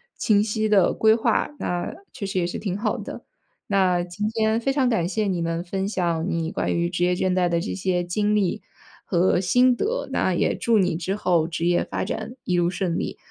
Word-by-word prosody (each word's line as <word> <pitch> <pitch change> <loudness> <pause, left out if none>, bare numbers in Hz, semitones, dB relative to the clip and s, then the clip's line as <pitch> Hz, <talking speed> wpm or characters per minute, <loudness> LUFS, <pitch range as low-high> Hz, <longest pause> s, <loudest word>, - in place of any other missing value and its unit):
清 205 -2 +3
晰 215 0 -1
的 200 -4 +4
规 220 0 +4
划， 225 - +1
那 175 0 -2 0.2
确 210 - -5
实 190 -1 -1
也 175 - +1
是 - - -4
挺 195 -2 -3
好 210 - -1
的。 - - -8 0.4
那 185 -3 +2
今 205 +5 -3
天 220 0 +1
非 270 - +1
常 270 -2 +2
感 180 -8 +1
谢 215 +1 -1
你 185 -4 -1
能 165 0 -2
分 190 +2 -3
享 170 -5 -1
你 165 -2 -2
关 - - -1
于 170 0 0
职 175 0 -1
业 180 0 +2
倦 185 +1 0
怠 180 -1 +2
的 170 0 +1
这 195 - -4
些 180 -2 -1
经 205 +4 0
历 195 -4 0 0.4
和 180 0 +2
心 250 +7 +4
得， 470 - -2
那 - - +1
也 - - +1
祝 230 -1 +2
你 180 -4 +2
之 185 +4 -2
后 175 -6 +1
职 165 0 -3
业 175 0 +2
发 - - -3
展 245 - -5
一 180 - 0
路 175 0 +2
顺 180 -2 -2
利。 - - -4
185 Hz, 240 characters per minute, -24 LUFS, 175-215 Hz, 0.4 s, 的